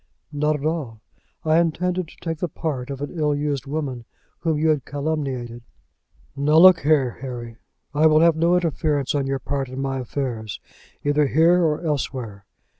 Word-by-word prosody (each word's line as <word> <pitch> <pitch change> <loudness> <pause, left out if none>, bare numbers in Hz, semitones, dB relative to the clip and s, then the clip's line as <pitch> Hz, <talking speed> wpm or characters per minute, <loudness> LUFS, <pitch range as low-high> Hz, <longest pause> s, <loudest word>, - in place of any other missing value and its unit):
"Not 150 +1 +1
at 150 0 -5
all; 150 -9 -2 0.5
I 160 +1 +4
intended 180 +1 0
to - - -16
take 165 -2 -4
the 180 - -1
part 145 -5 -4
of 140 0 -6
an 145 - -4
ill 150 -3 +1
used 145 -2 -2
woman 135 -5 -4 0.3
whom 160 -3 0
you 160 +1 +2
had 150 -4 +1
calumniated." 135 -5 -3 0.7
"Now 145 +3 +2
look 180 0 +8
here, 145 -5 +1
Harry, 120 -3 -7 0.4
I 155 +2 +5
will 155 0 +5
have 165 -1 +5
no 170 +2 +3
interference 155 -5 0
on 140 -2 0
your 135 0 0
part 135 0 -3
in 130 +1 -6
my 135 -1 -2
affairs, 120 -4 -4 0.4
either 145 0 +2
here 165 +6 +4
or 155 +1 0
elsewhere. 125 -8 -3
145 Hz, 175 wpm, -23 LUFS, 135-160 Hz, 0.7 s, look